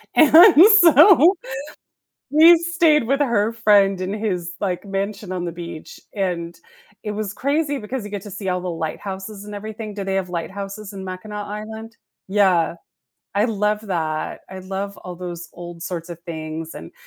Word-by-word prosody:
and 320 +5 +8 0.3
so, 335 +3 +7 1.0
we 325 +3 +8
stayed 335 -3 +2
with 275 +3 +1
her 230 -5 +1
friend 205 -4 +3
in 185 +2 -3
his, 185 -5 -3
like, 185 -3 -2
mansion 200 0 -4
on 180 -1 -3
the 170 - -3
beach, 170 -2 -9
and 170 -4 -3 0.4
it 210 - -3
was 210 -1 -4
crazy 285 +3 -1
because 245 +1 -5
you 205 - -8
get 200 -2 -6
to 205 - -10
see 195 -1 -4
all 180 0 -1
the 180 - -4
lighthouses 190 +5 -6
and 210 0 -8
everything. 215 +1 -7
Do 200 -1 -5
they 195 0 -2
have 190 -1 -1
lighthouses 195 +4 -6
in 195 -1 -8
Mackinac 205 +3 -6
Island? 220 +2 -8 0.3
Yeah, 190 -5 +2 0.6
I 205 +2 +2
love 210 -2 0
that. 160 -4 -3
I 190 0 -8
love 195 +2 -5
all 180 -1 -8
those 175 -1 -7
old 175 -1 -9
sorts 175 -1 -5
of 170 -1 -8
things, 160 -1 -7
and, 80 - -10
200 Hz, 170 wpm, -21 LUFS, 180-220 Hz, 1.0 s, and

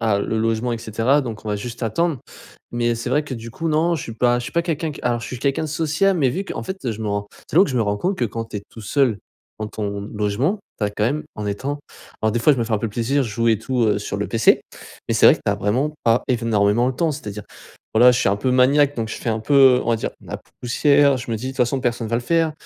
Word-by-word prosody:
ah, 110 -3 +2
le 110 - -2
logement 115 +2 0
et 115 - -3
cetera 115 +5 +1
donc 115 -6 -6
on - - -5
va 105 - 0
juste 120 +4 -7
attendre.». 150 +6 0 0.5
Mais, 120 0 +1
c'est 115 - -4
vrai 150 - +2
que, 135 - -5
du 115 0 -8
coup 165 +8 -3
non, 160 +3 +2
je 160 - -3
suis 115 - -7
pas, 120 +1 +2
je - - -6
suis 140 - -7
pas 170 - +2
quelqu'un 160 -2 -2
qui - - -10
alors 120 -1 0
je - - -6
suis 125 - -6
quelqu'un 140 +4 0
de 155 - -4
sociable, 165 +5 +1
mais 135 -4 +3
vu 190 +9 -3
qu'en - - -5
fait 190 -10 -4
je 110 - -6
me 110 - -2
rends, 100 0 -2 0.2
c'est - - -4
là 185 - +8
que - - -4
je 130 - -2
me 120 - +3
rends 105 -1 0
compte 185 - -1
que, 120 - +1
quand 115 +1 -4
tu 105 - -7
es 100 - -5
tout 115 - -12
seul, 120 -1 +1 0.4
dans 110 - -2
ton 100 -2 -4
logement, 105 - 0 0.2
tu 105 - 0
as 105 - 0
quand 105 - -4
même, 150 +7 -1
en 105 - -5
étant 135 +9 -3 0.4
Alors 110 - +3
des 120 - 0
fois 150 - +5
je 135 - -1
me 115 - +1
fais 115 - -5
un 110 - +2
peu 115 - -2
plaisir, 120 +6 0
je - - -4
joue 115 +2 0
et 110 -2 +3
tout 125 +3 -1
heu 105 - +2
sur - - -4
le - - -2
PC, - - +4 0.5
mais - - +1
c'est - - +6
vrai - - +8
que - - -17
tu - - +2
as - - +1
vraiment 130 +9 0
pas 115 +1 +3
énormément 115 -2 +2
le 130 - -3
temps, 165 +5 +1
c'est-à-dire 105 -7 -7 0.5
voilà, 125 +3 +7
je 125 - +1
suis - - +2
un 100 - +2
peu 125 +5 -1
maniaque 140 +3 +4
donc 115 -1 -2
je - - -5
fais 120 - -3
un 110 0 -1
peu, 140 +6 0 0.2
heu, - - -3
on - - -4
va 115 - +2
dire, - - -3
ma - - -7 0.2
poussière, 140 +3 +3
je 120 -1 -6
me - - 0
dis, 120 +4 -6
de - - -2
toutes - - -16
façons, 125 +1 +1
personne 120 -2 -1
va 115 - -2
le 120 - -2
faire. 165 +3 +1
120 Hz, 305 wpm, -21 LUFS, 110-145 Hz, 0.5 s, là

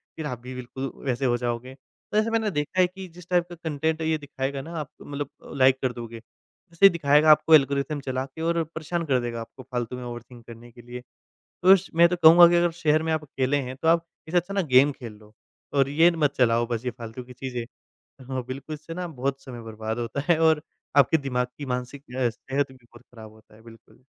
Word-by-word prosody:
फिर 160 - -6
आप 125 -5 -4
भी 125 +1 -8
बिल्कुल 130 +2 -6
वैसे 130 0 -1
हो 120 -1 +2
जाओगे। 120 +1 -4
तो 140 +9 -8
ऐसा 215 +1 +2
मैंने 220 -2 0
देखा 150 +3 -2
है 180 - +6
कि 190 +1 -10
जिस 180 0 -14
टाइप 175 -1 +2
का 175 - -8
कंटेंट 160 -1 -2
ये 160 0 +1
दिखाएगा 140 -1 -4
ना 165 +4 -9
आप 150 - -6
मतलब 145 -1 -5 0.3
लाइक 130 0 +5
कर 130 - 0
दोगे, 115 -1 -8
वैसे 170 - -3
ही - - +11
दिखाएगा 155 -2 +4
आपको 160 +1 +6
एल्गोरिदम 140 +1 +1
चला 130 0 -3
के 140 +4 -11
और 170 0 +1
परेशान 160 +2 -4
कर 130 -4 +2
देगा 115 -1 -4
आपको 120 +3 -11
फ़ालतू 125 -1 -4
में 125 - -7
ओवरथिंक 120 0 -9
करने 120 +1 -12
के 120 - -15
लिए। 120 +1 -9 0.7
उश 195 0 +1
मैं 170 +1 +7
तो 180 - 0
कहूँगा 170 +2 +10
कि 175 - +2
अगर 175 0 +3
शहर 155 -2 +1
में 160 - -1
आप 155 -1 -1
अकेले 135 0 -1
हैं, 130 -2 -4
तो 150 +5 -3
आप 165 0 +3 0.2
इससे 175 +3 0
अच्छा 180 +3 -1
ना 200 - +1
गेम 140 +3 +7
खेल 115 -4 -8
लो 105 0 -19 0.4
और 135 -1 +2
ये 160 +4 +5
न - - -6
मत 140 -1 +3
चलाओ 120 -2 +3
बस 120 +1 -3
ये 125 - -1
फ़ालतू 115 +1 -9
की 125 +1 -13
चीज़ें 125 -1 -5 0.7
हाँ, 130 -1 -3
बिल्कुल 135 +4 -6
इससे 155 +2 -10
ना 180 +1 -4
बहुत 135 -2 -3
समय 120 -3 -9
बर्बाद 110 +1 -5
होता 120 +4 -3
है 165 -2 +4
और 160 -2 +4 0.4
आपके 140 +3 +5
दिमाग 125 -4 -2
की 145 - -6
मानसिक 125 +2 -4
अ, 125 -2 +2
सेहत 135 +4 -3
भी 130 - -16
बहुत 120 0 -18
ख़राब 110 -2 -12
होता 110 0 -21
है, 110 - -18
बिल्कुल। 115 +2 -18
135 Hz, 235 wpm, -25 LUFS, 125-160 Hz, 0.7 s, ही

